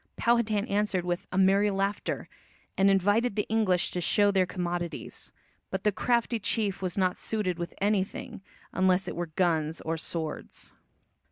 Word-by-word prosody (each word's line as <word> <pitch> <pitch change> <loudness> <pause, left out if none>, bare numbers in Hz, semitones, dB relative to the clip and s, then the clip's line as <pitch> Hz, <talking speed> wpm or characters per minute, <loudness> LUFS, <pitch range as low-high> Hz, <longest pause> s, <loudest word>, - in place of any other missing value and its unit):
Powhatan 225 -3 +2
answered 200 -4 0
with 175 0 -2
"a 185 - -2
merry 195 +2 +4
laughter," 195 +1 -2 0.5
and 195 +1 +4
invited 205 +4 +2
the 210 - 0
English 210 -6 +2
to 180 - -1
show 205 +4 +4
their 190 -2 +2
commodities. 175 -3 -4 0.4
But 190 0 -3
the 210 - +3
crafty 235 +2 +1
chief 205 -1 0
was 185 -1 -3
not 185 -2 +1
suited 190 -6 -2
with 170 +1 -5
anything, 200 -1 -1 0.3
unless 185 0 +2
it - - -4
were 175 0 -3
guns 160 -1 0
or 165 +1 -2
swords. 160 -1 -5
190 Hz, 155 wpm, -28 LUFS, 175-210 Hz, 0.5 s, merry